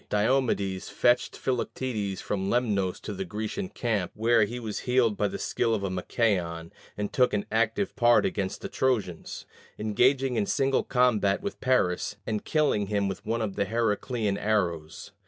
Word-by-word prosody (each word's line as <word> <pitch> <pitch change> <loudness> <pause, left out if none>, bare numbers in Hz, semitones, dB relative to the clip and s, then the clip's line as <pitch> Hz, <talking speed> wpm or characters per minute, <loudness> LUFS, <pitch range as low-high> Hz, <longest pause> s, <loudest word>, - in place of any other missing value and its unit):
Diomedes 105 -4 +1
fetched 120 0 +2
Philoctetes 115 -6 -2
from 95 -1 -2
Lemnos 100 -6 0
to 105 - -5
the 95 - -3
Grecian 110 - -4
camp, 110 - -1
where 115 0 +4
he 120 +4 -6
was 110 -3 -4
healed 125 -4 +3
by 105 - +1
the - - -5
skill 115 -2 0
of 100 - -4
Machaon, 90 -3 -1 0.3
and 105 0 -3
took 125 -4 +3
an 100 - -1
active 115 - 0
part 120 0 +4
against 95 -2 -2
the - - -4
Trojans 110 -10 -2 0.3
engaging 125 +4 +2
in 100 - +1
single 135 0 +1
combat 120 - +2
with 200 - -5
Paris, 105 -7 +1
and 105 -2 -2
killing 145 -10 +1
him 100 -1 0
with 95 - -5
one 115 0 0
of 100 -3 -3
the 100 - 0
Heracleian 110 -1 -1
arrows. 85 -7 -1
110 Hz, 160 wpm, -27 LUFS, 100-125 Hz, 0.3 s, where